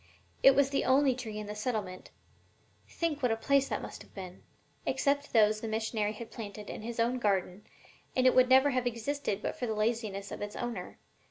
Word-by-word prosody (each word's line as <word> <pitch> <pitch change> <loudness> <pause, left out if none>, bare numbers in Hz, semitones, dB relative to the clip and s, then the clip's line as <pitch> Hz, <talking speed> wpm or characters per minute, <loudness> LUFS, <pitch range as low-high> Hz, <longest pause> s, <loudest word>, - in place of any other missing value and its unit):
It 270 - +7
was 275 -1 +3
the 275 - +1
only 265 +1 +4
tree 225 -4 -6
in 210 - -4
the 210 - -5
settlement 210 -4 -4 0.8
think 320 -4 -2
what 250 -3 +2
a - - +2
place 275 +4 +2
that - - -2
must - - -8
have - - -16
been! 185 -2 -8 0.4
except 285 0 0
those 215 -1 +4
the 225 - -4
missionary 220 -1 -1
had 225 +1 -9
planted 210 -2 -7
in - - -7
his 230 +1 -6
own 240 +2 +1
garden, 195 -2 -1 0.5
and 255 - +2
it 255 - +6
would 255 0 +5
never 265 +2 +6
have 250 -1 0
existed 235 -2 -2
but - - -2
for 245 - -3
the 220 - -1
laziness 215 -2 -1
of - - -6
its 205 0 -5
owner. 235 -7 -5
230 Hz, 205 wpm, -31 LUFS, 210-260 Hz, 0.8 s, It